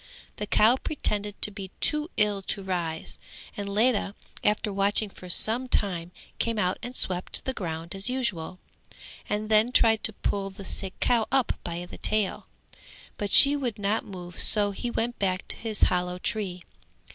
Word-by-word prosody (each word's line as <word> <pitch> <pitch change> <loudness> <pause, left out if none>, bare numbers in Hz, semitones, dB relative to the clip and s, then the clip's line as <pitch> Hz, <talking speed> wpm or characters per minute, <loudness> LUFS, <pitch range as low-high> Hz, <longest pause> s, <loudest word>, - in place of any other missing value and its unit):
The 210 - -4
cow 225 +6 +4
pretended 210 -9 -3
to 210 - -2
be 195 -2 -8
too 300 +2 0
ill 210 -2 +1
to 195 +1 -3
rise, 170 -4 -4 0.4
and 200 -1 -5
Ledha 210 -1 +1 0.3
after 210 0 +1
watching 200 +1 +2
for 180 - -12
some 225 +8 +2
time 180 -7 -1 0.3
came 230 -1 0
out 180 -3 0
and 245 +1 -7
swept 180 -5 +2
the 265 - -1
ground 165 -5 -5
as 195 +4 -2
usual, 210 -10 -2 0.7
and 210 +1 -2
then 215 +2 +3
tried 225 -3 +3
to 220 - +5
pull 200 -1 -2
the 195 0 -11
sick 190 0 -2
cow 235 -3 +2
up 265 -2 +2
by 175 0 -5
the - - -12
tail; 215 -3 -1 0.7
but 205 - -3
she 280 +6 +9
would 255 -6 -3
not 205 +1 0
move 180 -3 -8
so 205 -2 +5
he 240 +5 -4
went 235 0 -2
back 185 -1 -1
to - - 0
his 220 -3 -5
hollow 180 0 +1
tree. 185 -2 -3
205 Hz, 170 wpm, -26 LUFS, 185-225 Hz, 0.7 s, she